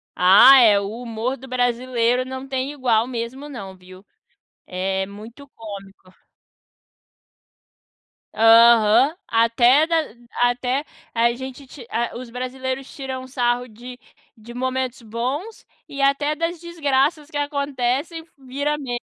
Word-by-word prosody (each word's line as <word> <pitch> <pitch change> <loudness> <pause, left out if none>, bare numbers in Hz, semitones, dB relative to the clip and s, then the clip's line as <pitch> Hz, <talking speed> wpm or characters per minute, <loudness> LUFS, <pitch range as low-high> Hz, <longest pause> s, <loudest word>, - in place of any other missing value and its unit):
Ah, 220 +9 +8
é! 210 -3 +5
O 200 0 -4
humor 235 +2 -4
do 265 +2 -12
brasileiro 245 0 0
não 260 +1 -7
tem 265 +1 -3
igual 245 -5 +1
mesmo 255 +4 -6
não, 195 -8 -8
viu. 185 +2 -16 0.6
É 190 +1 -2
muito 225 +8 -12
cômico. 195 -5 -12 2.2
Aham, 230 +4 +5
até 240 +6 +3
da 335 - 0 0.4
até 250 +4 0 0.3
a 235 +1 +3
gente 260 +2 -9
ti 255 -2 -12
a 235 +1 -2
os 245 -1 -8
brasileiros 260 +2 -5
tiram 265 -2 -6
um - - -11
sarro 245 -1 -1
de 245 +3 -11 0.4
de 225 +2 -12
momentos 260 0 -3
bons 255 - -5 0.2
e 280 - -9
até 290 +2 +1
das 335 +1 -3
desgraças 300 -2 -1
que 290 - -4
acontecem 285 +2 -2
vira 280 +3 -3
me 245 -4 -4
250 Hz, 125 wpm, -21 LUFS, 230-275 Hz, 2.2 s, Ah